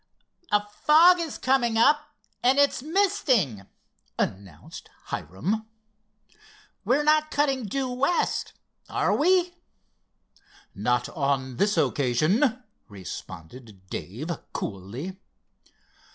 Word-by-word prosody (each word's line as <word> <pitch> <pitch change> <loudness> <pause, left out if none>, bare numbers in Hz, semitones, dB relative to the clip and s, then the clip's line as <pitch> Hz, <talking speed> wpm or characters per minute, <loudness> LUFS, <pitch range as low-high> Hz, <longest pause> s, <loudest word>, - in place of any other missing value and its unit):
"A 205 0 +2
fog 320 +11 +5
is 330 -4 -4
coming 240 -3 +1
up, 295 +5 +3 0.3
and 255 +3 +3
it's 285 -3 +3
misting," 270 - +1 0.5
announced 95 -5 -5 0.2
Hiram. 190 - -3 1.2
"We're 255 +8 +2
not 305 +1 +3
cutting 275 -5 0
due 265 +6 -2
west, 275 +8 0 0.4
are - - +1
we?" 360 +2 +3 1.2
"Not 120 +4 0
on 135 -4 -2
this 205 +6 +1
occasion," 185 - +1 0.3
responded 95 +2 -10
Dave 130 - -5 0.2
coolly. 115 - -6
210 Hz, 90 wpm, -26 LUFS, -, 1.2 s, fog